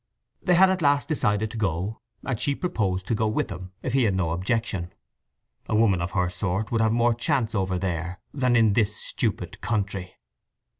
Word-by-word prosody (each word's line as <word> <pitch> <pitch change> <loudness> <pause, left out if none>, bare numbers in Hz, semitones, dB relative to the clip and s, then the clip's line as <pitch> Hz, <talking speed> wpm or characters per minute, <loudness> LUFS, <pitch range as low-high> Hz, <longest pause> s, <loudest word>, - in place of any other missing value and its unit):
They 180 - +3
had 190 +2 +6
at 185 -1 -1
last 145 -1 +3
decided 110 -8 0
to - - -7
go, 100 +1 -2 0.2
and 125 -5 -2
she 140 +2 +1
proposed 95 - -1
to - - -1
go 110 0 +1
with 110 - -1
them, 90 0 -7
if 125 - -2
he 135 -3 +4
had 100 -3 +1
no 90 -4 0
objection. 95 0 -1 0.8
A 110 - +1
woman 105 -5 +3
of 90 0 -3
her 90 -2 +2
sort 95 +3 -2
would 115 -1 +2
have 110 -1 +3
more 120 +1 +3
chance 115 0 0
over 95 -3 0
there 90 -1 -3
than 125 -3 +2
in 110 -3 +5
this 105 -1 +2
stupid 105 -6 -3
country. 95 -3 -2
105 Hz, 195 wpm, -25 LUFS, 95-120 Hz, 0.8 s, had